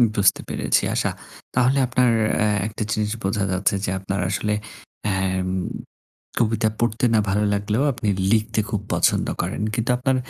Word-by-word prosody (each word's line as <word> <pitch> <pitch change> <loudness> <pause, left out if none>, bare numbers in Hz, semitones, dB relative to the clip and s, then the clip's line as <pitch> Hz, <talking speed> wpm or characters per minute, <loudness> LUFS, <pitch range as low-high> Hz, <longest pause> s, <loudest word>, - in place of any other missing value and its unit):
বুঝতে 100 -1 +3
পেরেছি - - +1
আচ্ছা। - - +1 0.4
তাহলে 130 +2 +3
আপনার 125 0 +3 0.6
একটা 110 0 -4
জিনিস 105 -1 0
বোঝা 95 +1 0
যাচ্ছে 95 +2 +1
যে - - -2
আপনার 95 0 -3
আসলে 105 +1 0 0.5
অ্যাম 95 -2 0 0.9
কবিতা 110 -1 +2
পড়তে 120 +1 +1
না - - +5
ভালো 105 +2 +1
লাগলেও 105 +5 0
আপনি 110 -3 -3 0.2
লিখতে 110 0 +2
খুব 105 - -1
পছন্দ - - +2 0.2
করেন। - - -3
কিন্তু 115 +2 -1
আপনার 130 +1 +1
105 Hz, 145 wpm, -23 LUFS, 100-120 Hz, 0.9 s, না